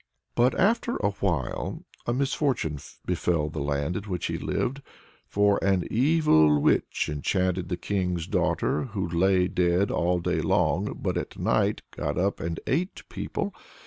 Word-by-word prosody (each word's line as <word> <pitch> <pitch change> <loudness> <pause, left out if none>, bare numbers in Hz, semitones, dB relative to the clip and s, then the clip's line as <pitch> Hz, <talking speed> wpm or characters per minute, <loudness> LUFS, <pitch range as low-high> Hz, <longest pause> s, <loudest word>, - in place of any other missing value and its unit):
But 125 +2 +2
after 230 +4 +2
a 100 - 0
while 85 -10 -2 0.2
a 120 - +2
misfortune 130 - 0 0.3
befell 85 -3 0
the 75 0 -4
land 70 +4 -1
in 100 - -4
which 90 -4 -3
he - - -2
lived, 135 +3 -2 0.5
for 100 0 +2
"an 95 -2 +2
evil 115 - +4
witch - - +1
enchanted 90 +4 -1
the 90 - -1
king's 90 -3 -1
daughter, - - 0
who 100 -7 -3
lay 90 +2 +3
dead 90 +2 +2
all 90 +1 +1
day 85 - 0
long, - - +1
but - - -1
at - - -5
night - - +1
got 75 - -3
up 100 +3 0
and 85 -1 -3
ate 175 +8 -1
people." - - -3
90 Hz, 150 wpm, -27 LUFS, 85-105 Hz, 0.5 s, evil